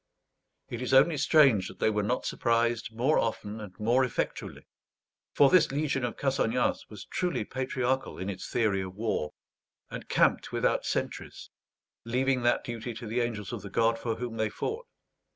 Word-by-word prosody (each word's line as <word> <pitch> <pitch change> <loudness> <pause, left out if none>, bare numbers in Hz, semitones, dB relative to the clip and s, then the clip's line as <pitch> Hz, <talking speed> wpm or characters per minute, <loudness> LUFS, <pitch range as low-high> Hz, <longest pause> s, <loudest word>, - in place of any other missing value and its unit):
It 120 - -6
is 130 +1 +1
only 150 +5 +6
strange 135 - +4
that - - -11
they 110 - +2
were 105 0 0
not 120 +5 -1
surprised 115 -1 0
more 125 +7 +2
often 110 -1 -3
and 100 -3 -10
more 120 +5 +3
effectually; 125 - -3 0.7
for 140 -1 +5
this 180 -6 +5
legion 140 -2 -1
of 120 -2 -3
Cassagnas 125 -3 0
was 105 -3 -10
truly 175 - -2
patriarchal 130 +1 -2
in 95 - -5
its 95 -2 -5
theory 105 -5 +1
of 95 0 -7
war, 105 -8 -2 0.6
and - - -7
camped - - +2
without - - 0
sentries, - - -4 0.5
leaving 125 +2 +1
that 120 0 +2
duty 120 0 -5
to 115 - -7
the 115 +3 -1
angels 110 -4 -3
of - - -5
the 100 - -8
God 115 +3 +2
for 115 -1 -2
whom 120 -1 -5
they 110 -1 0
fought. 450 - -4
120 Hz, 170 wpm, -29 LUFS, 110-130 Hz, 0.7 s, only